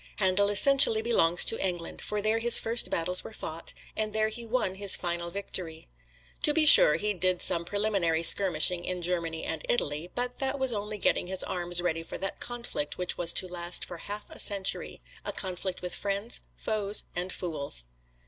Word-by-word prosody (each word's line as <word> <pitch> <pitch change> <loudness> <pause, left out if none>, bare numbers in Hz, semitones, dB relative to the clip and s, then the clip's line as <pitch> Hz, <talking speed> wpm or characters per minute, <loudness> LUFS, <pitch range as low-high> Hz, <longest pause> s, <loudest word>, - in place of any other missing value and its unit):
Handel 200 +1 +1
essentially 225 0 +6
belongs 175 -7 +3
to 225 - 0
England, 175 -3 -4
for 210 -1 -5
there 220 +1 0
his 235 +1 +8
first 230 +1 +2
battles 180 +2 0
were - - -11
fought, 165 -5 -4 0.2
and 215 -1 -3
there 215 0 0
he 235 +2 -8
won 225 -5 -2
his 195 0 +3
final 170 -1 -4
victory. 175 -4 -6 0.5
To 295 - +2
be 320 -1 +3
sure, - - +10
he 210 0 -2
did 185 -1 0
some 170 -1 +2
preliminary 195 -5 -1
skirmishing 175 -1 +4
in 180 -1 -5
Germany 170 -2 -3
and 160 - -5
Italy; 155 -6 -1
but 245 0 -3
that 270 +1 -1
was 265 -3 0
only 210 0 -5
getting 185 - -1
his 190 0 -2
arms 175 -1 -3
ready 165 -2 -2
for 165 - -9
that 195 - -6
conflict 240 -11 -6
which 180 0 -2
was 170 -1 +2
to 185 - +1
last 175 0 -2
for 175 - -10
half 205 +5 -9
a - - -10
century 195 -2 -1 0.2
a - - -5
conflict 185 -1 -5
with 180 - -4
friends, 200 +3 -3
foes 210 -1 -1
and 180 +2 -4
fools. 145 - -4
190 Hz, 185 wpm, -27 LUFS, 175-215 Hz, 0.5 s, sure